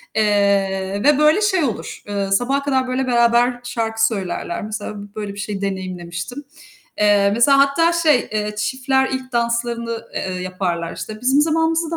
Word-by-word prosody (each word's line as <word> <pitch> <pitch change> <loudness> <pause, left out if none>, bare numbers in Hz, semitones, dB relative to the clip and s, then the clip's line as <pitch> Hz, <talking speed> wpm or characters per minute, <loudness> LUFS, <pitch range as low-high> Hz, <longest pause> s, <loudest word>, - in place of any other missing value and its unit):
eee, 200 -2 +1
ve 295 -1 +5
böyle 305 +7 +4
şey 380 -6 +2
olur, 235 -6 -4
eee, 200 -1 -2
sabaha 270 +7 +1
kadar 260 -2 0
böyle 255 +1 -1
beraber 240 0 +3
şarkı 225 -2 0
söylerler. 190 -4 -3
Mesela 215 0 -5 0.2
böyle 210 -2 -5
bir 200 - -10
şeyi 205 -2 -4
deneyimlemiştim. 185 +5 -5 0.5
Eee, 205 -1 +4
mesela 255 +5 +4
hatta 330 +5 +3
şey, 310 -7 +2
eee, 210 0 -2
çiftler 265 +3 0
ilk 260 0 -5
danslarını, 235 -1 -2
eee, 185 -1 -3
yaparlar. 180 -2 -3
İşte 215 +1 -7
bizim 265 +3 +3
zamanımızda 325 +1 +1
235 Hz, 150 wpm, -20 LUFS, 200-265 Hz, 0.5 s, ve